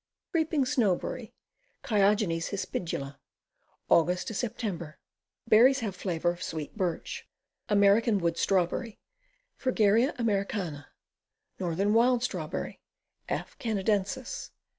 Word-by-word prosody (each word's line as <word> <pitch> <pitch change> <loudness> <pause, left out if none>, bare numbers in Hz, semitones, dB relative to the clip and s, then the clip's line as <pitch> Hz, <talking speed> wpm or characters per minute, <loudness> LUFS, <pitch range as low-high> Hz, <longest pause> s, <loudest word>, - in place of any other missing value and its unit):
Creeping 320 -4 +1
Snowberry. 240 -10 0 0.5
Chiogenes 200 -5 +2
hispidma. 165 -8 -4 0.7
Aug. 180 +5 +3
Sep. 195 -8 -3 0.5
Berries 250 +5 +6
have 205 -5 -3
flavor 175 -2 0
of 175 +1 -9
sweet 155 -4 -5
birch. 180 -6 -3 0.4
American 205 +2 +4
Wood 170 -3 0
Strawberry. 195 +6 0 0.6
Fragaria 230 0 +2
Americana. 195 - -1 0.7
Northern 190 +4 0
Wild 240 +1 +4
Strawberry. 175 -9 -4 0.5
F. - - -3
Canadensis. 210 - -1
200 Hz, 90 wpm, -29 LUFS, 175-230 Hz, 0.7 s, Berries